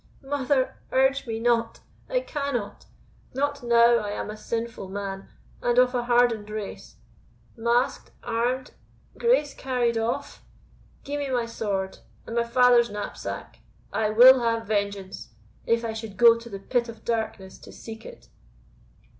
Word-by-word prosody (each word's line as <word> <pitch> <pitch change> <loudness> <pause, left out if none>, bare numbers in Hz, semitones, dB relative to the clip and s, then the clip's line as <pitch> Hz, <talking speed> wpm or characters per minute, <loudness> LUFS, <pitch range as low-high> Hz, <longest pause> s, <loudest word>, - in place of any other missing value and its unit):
mother! 270 -1 0
urge 265 0 +2
me 225 -1 -3
not 230 -1 +1 0.3
I - - +1
cannot 280 - -4 0.5
not 285 +1 -1
now 235 0 +5
I 210 -2 -3
am 205 +1 -4
a - - -7
sinful 225 -2 -4
man, 195 0 -5 0.3
and 240 0 +1
of 250 0 +5
a 245 -1 -1
hardened 240 -3 +2
race. 210 -1 -7 0.6
Masked 235 +2 0
armed 245 +3 -1 0.5
Grace 470 - +2
carried 245 -3 0
off! 225 +1 -3 0.6
Gie 285 +1 -4
me 285 -1 -3
my 245 -2 0
sword, 200 -4 -3 0.3
and 230 - -6
my 235 - +2
father's 240 0 +4
knapsack 205 0 -6 0.3
I 220 -1 +1
will 250 +4 +8
have 230 -1 0
vengeance, 200 - -3 0.3
if 230 0 +2
I 225 - -2
should 220 -3 -7
go 230 +1 +8
to 230 0 -9
the 200 - -6
pit 235 +4 -1
of 225 - -11
darkness 220 -4 -3
to - - -13
seek 225 0 -10
it!" - - -12
235 Hz, 145 wpm, -25 LUFS, 220-250 Hz, 0.6 s, will